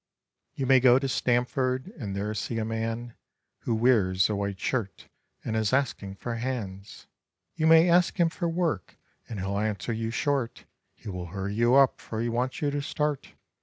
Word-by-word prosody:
You 135 - -2
may 130 0 +6
go 125 -1 +6
to 135 +1 -1
Stamford 130 - 0
and 105 - -5
there 105 +2 -2
see 115 +2 -3
a 110 - -1
man 115 +1 -3 0.5
Who 115 - -1
wears 105 -5 +3
a - - 0
white 100 -1 -3
shirt 110 -5 -3 0.4
and 110 - -2
is 110 +1 0
asking 120 -8 -1
for 115 +3 -5
hands; 110 -6 -5 0.5
You 160 -1 +1
may 165 +1 +7
ask 175 +2 +3
him 170 -1 +4
for 170 0 -2
work 165 - -2 0.3
and 110 - -5
he'll 100 +1 -2
answer 110 +2 -2
you 115 0 -2
short, 130 0 -1 0.3
He - - -14
will 90 -2 -5
hurry 95 +3 -4
you 120 +4 +3
up, 135 -1 +4
for 110 - -5
he 120 +1 0
wants 125 +5 -2
you 145 - +1
to 145 0 -2
start. 150 0 -3
120 Hz, 185 wpm, -27 LUFS, 105-135 Hz, 0.5 s, may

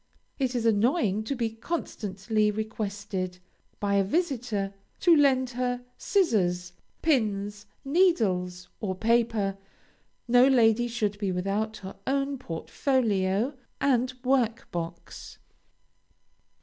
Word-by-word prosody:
It 260 -2 0
is 235 -2 0
annoying 220 - +2
to 275 - -2
be 230 -3 -1
constantly 215 - -1
requested 205 -3 -3 0.4
by 200 -1 +1
a 195 - +4
visitor 230 - -1 0.3
to 345 -2 +6
lend 260 -4 +3
her 245 0 -2
scissors, 180 - +1 0.3
pins, 210 -8 0 0.2
needles, 195 - +2
or 190 -4 -2
paper; 225 -2 +1 0.7
no 245 +2 +6
lady 240 -2 +4
should 215 -4 -2
be 200 -3 0
without 200 +4 -1
her 190 - -8
own 275 0 0
portfolio 210 - 0 0.3
and 255 -2 +2
work 250 -3 +1
box. 170 0 -6
220 Hz, 105 wpm, -27 LUFS, 195-255 Hz, 0.7 s, to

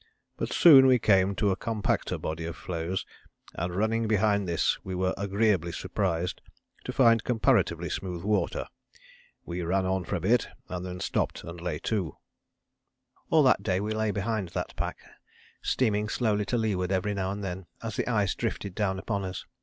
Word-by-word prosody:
But - - -3
soon 135 -6 +8
we 130 -1 +6
came 95 -3 +3
to 100 +3 +2
a - - +1
compacter 110 +1 -1
body 80 +1 -4
of 85 - -5
floes, 85 +2 -3 0.5
and 90 +1 -3
running 110 +3 +1
behind 105 -2 +2
this 85 -2 0
we 95 - -4
were 95 +1 0
agreeably 100 -3 +1
surprised 90 0 -2 0.4
to - - -3
find 115 -1 +4
comparatively 120 -3 +2
smooth 90 -3 -4
water. 105 +1 0 0.8
We 90 +1 -4
ran 95 +3 0
on 95 0 0
for - - -2
a - - -1
bit, 110 +8 +2 0.2
then 90 0 -5
stopped - - -1
and 85 0 -8
lay 90 0 -2
to." 95 -9 -1 1.1
All 160 -2 +5
that 130 - +4
day 95 -2 0
we 105 +2 -2
lay 110 0 0
behind 105 -2 -2
that - - -3
pack, - - -3 0.6
steaming 105 -4 +1
slowly 105 -4 +1
to 120 - 0
leeward 100 -5 0
every 95 +2 0
now 95 -2 -2
and 100 +1 -4
then, 95 -1 -5 0.2
as 110 -3 -4
the - - -1
ice 105 -5 +1
drifted 105 -4 -3
down 95 -1 0
upon 100 0 -2
us. 95 0 -5
100 Hz, 175 wpm, -28 LUFS, 90-110 Hz, 1.1 s, soon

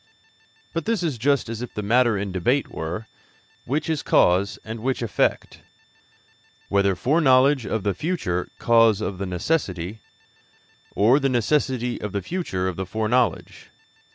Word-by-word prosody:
But 165 -2 -3
this 225 -5 0
is 150 -8 -2
just 140 +2 +1
as 115 0 -5
if 125 - -7
the 105 - -3
matter 120 +1 +3
in 100 0 -3
debate 120 +10 0
were, 85 +7 -5 0.6
which 145 +5 -2
is 160 -3 -1
cause 95 +4 +2
and 110 +1 -6
which 125 +1 -2
effect 115 - -1 1.1
whether 100 -1 +2
foreknowledge 135 - +3
of 110 -1 -2
the 100 - 0
future 90 - -2
cause 115 -3 +4
of 100 -4 -4
the 100 - -3
necessity, 95 - -2 0.9
or 120 +8 +4
the 135 -1 +1
necessity 125 0 0
of 105 - -5
the 100 -2 -2
future 95 - -3
of 95 - -4
the 95 - -3
foreknowledge. 110 +1 -1
115 Hz, 150 wpm, -23 LUFS, 100-135 Hz, 1.1 s, cause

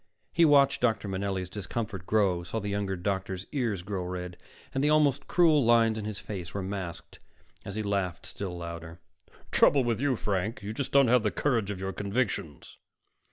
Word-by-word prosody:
He 170 - +5
watched 140 -2 +5
Dr. 115 -3 +1
Manelli's 95 -1 -2
discomfort 95 0 -5
grow, 100 -5 +2
saw 90 +6 -4
the 105 -1 -4
younger 100 -1 -1
doctor's 95 0 -3
ears 115 -10 -1
grow 95 -1 -3
red, 90 0 -5 0.4
and 135 - 0
the 150 - +3
almost 145 -2 +3
cruel 160 -5 +4
lines 115 -1 +4
in 110 -1 -4
his 105 -2 -4
face 90 -4 -7
were 100 - -2
masked 95 -3 -6 0.5
as 100 - -6
he 110 - -2
laughed 100 -4 -2
still 90 -3 -5
louder. 85 0 -7 0.5
"Trouble 140 -2 +5
with 120 -1 -1
you, 140 -2 +2
Frank, 105 0 -2
you 105 +2 -4
just 135 +3 -3
don't 140 -2 +5
have 125 +1 +5
the 105 - +1
courage 115 -5 0
of 100 -2 -4
your 95 0 -3
convictions." 100 - -3
100 Hz, 185 wpm, -28 LUFS, 95-120 Hz, 0.5 s, He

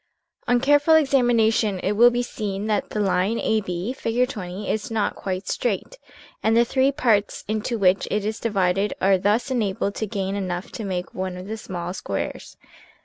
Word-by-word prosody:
On 245 0 +3
careful 290 +4 +4
examination 235 -8 +3
it 195 - 0
will 235 +4 +6
be 245 0 -1
seen 205 -4 -4
that 215 -2 0
the 215 - -3
line 195 +2 +1
AB, 205 0 -1
Fig. 250 -1 0
20, 195 -4 -6
is 220 +3 -2
not 220 -2 -1
quite 190 0 -4
straight 245 - -2 0.4
and 225 +1 +3
the 235 - +5
three 265 +3 +2
parts 230 -8 +1
into 215 +3 -2
which 190 -2 +3
it 210 -1 -1
is 215 +1 -2
divided 195 -2 0
are 190 0 +3
thus 210 +8 +1
enabled 200 -4 -1
to 220 - -3
gain 195 -2 -3
enough 185 -2 -4
to 220 - -6
make 180 -2 -4
one 185 -1 -4
of 180 - -8
the 215 +2 -4
small 180 -4 -5
squares. - - -5
210 Hz, 180 wpm, -23 LUFS, 190-235 Hz, 0.4 s, will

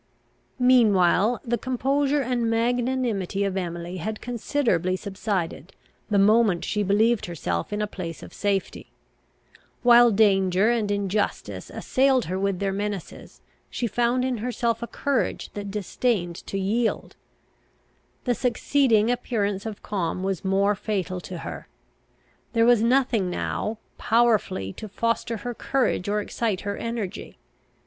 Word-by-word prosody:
Meanwhile, 225 -3 +4
the 240 0 0
composure 275 +3 +1
and 240 -2 0
magnanimity 235 -4 0
of 195 -1 -1
Emily 175 -1 -4
had 215 +5 -4
considerably 230 - 0
subsided, 190 -4 -4 0.3
the 205 - +2
moment 205 -2 +4
she 210 - -1
believed 210 +3 +2
herself 90 - -3
in 210 0 -1
a - - +1
place 175 -5 -7
of - - -11
safety. 200 -2 -2 0.9
While 240 0 +7
danger 195 -1 +3
and 225 -4 0
injustice 200 0 -2
assailed 260 -1 +2
her 185 +2 -3
with 195 -1 0
their 195 +1 -1
menaces, 200 -2 -5 0.3
she 245 - -3
found 240 +3 +1
in 255 -2 -1
herself 235 0 -1
a 235 - -4
courage 280 0 -1
that 205 -1 -5
disdained 200 -3 -1
to 195 - -3
yield. 220 +5 -1 1.1
The 245 - +1
succeeding 240 -2 +2
appearance 210 -4 -1
of 215 -2 -7
calm 185 -2 -2
was 190 -3 -2
more 195 +1 +2
fatal 190 -3 -3
to 180 0 -7
her. - - -7 0.9
There 230 -1 +4
was 240 -2 +5
nothing 235 -5 +2
now, 215 +4 -3 0.2
powerfully 220 - +2
to 215 - -8
foster 230 +2 -1
her 245 - -2
courage 250 -6 0
or 210 +1 +1
excite 210 -2 -2
her 200 0 -3
energy. 230 -5 -5
210 Hz, 135 wpm, -25 LUFS, 195-240 Hz, 1.1 s, While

